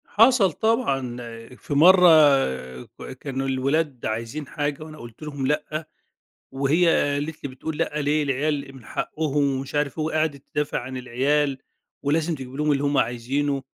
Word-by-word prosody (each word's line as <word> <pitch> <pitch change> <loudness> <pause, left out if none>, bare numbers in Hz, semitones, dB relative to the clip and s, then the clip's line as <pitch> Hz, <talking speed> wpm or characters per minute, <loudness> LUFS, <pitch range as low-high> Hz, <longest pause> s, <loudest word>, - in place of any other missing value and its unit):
حصل 225 -4 +4
طبعًا، 150 - 0 0.4
في 145 - -6
مرّة 180 +5 +7 0.8
ك - - -11
كانوا 135 -1 -3
الولاد 135 +1 -1
عايزين 115 +7 -4
حاجة 145 +1 -3
وأنا 155 0 -11
قُلت 120 +1 -11
لهم 145 -3 -3
لأ، 155 +2 -2 0.6
وهي 140 +6 +2 0.3
قالت 150 +2 -4
لي 140 - -3
بتقول 150 +4 -6
لأ 150 0 -1
ليه؟ 150 +1 +1
العيال 140 0 -2
من 125 -4 -14
حقُّهم 150 +2 -1 0.2
ومش 135 +2 -7
عارف 145 -1 -1
إيه 155 - 0
وقعدِت 155 -3 -1
تدافع 150 -1 -1
عن 130 +1 -6
العيال، 135 +3 0 0.5
ولازم 155 +3 +1
تجيب 130 -2 -9
لهم 150 +1 +1
اللي 140 0 0
هم 145 0 +1
عايزينُه، 135 +4 0
145 Hz, 155 wpm, -24 LUFS, 135-155 Hz, 0.8 s, مرّة